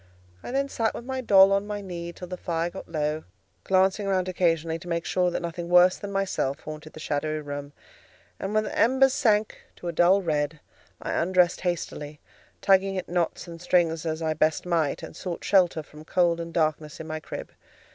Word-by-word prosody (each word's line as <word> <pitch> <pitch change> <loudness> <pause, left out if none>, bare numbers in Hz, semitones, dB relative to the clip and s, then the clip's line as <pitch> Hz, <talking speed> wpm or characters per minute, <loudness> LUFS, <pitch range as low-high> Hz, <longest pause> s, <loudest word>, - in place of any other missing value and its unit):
I - - -8
then 275 +2 0
sat 225 -5 -1
with 235 - -7
my 260 0 -3
doll 195 -4 +7
on 200 +1 +1
my 210 -1 -3
knee 175 -3 -6
till 180 +1 -9
the 180 - -5
fire 170 -1 -2
got 190 - -9
low, 155 -1 -1 0.4
glancing 190 +2 +2
round 185 -2 +1
occasionally 165 -3 0
to 175 - -12
make 170 -1 -2
sure 180 -1 +1
that 175 - -3
nothing 170 0 -5
worse 180 +1 +6
than 205 - -7
myself 195 -8 -1
haunted 155 0 -9
the - - -10
shadowy 155 0 -2
room; 145 -1 -6 0.7
and 195 - -3
when 215 - +3
the - - -5
embers 265 +2 +4
sank 215 -6 +2 0.2
to 175 - -8
a - - 0
dull 185 +4 +4
red, 150 -1 -1 0.4
I - - -2
undressed 180 0 +2
hastily, 155 -4 -3 0.4
tugging 195 0 +3
at 185 - -4
knots 175 0 -1
and 170 -1 -9
strings 170 -3 +2
as 160 +1 -2
I 160 -1 +1
best 155 +2 +1
might, 165 -5 0
and - - -8
sought 180 -3 -5
shelter 180 -5 +3
from 150 +1 -13
cold 170 0 +2
and 170 0 -5
darkness 155 -2 -1
in 160 - -6
my 155 0 -4
crib. - - -7
175 Hz, 200 wpm, -26 LUFS, 160-190 Hz, 0.7 s, doll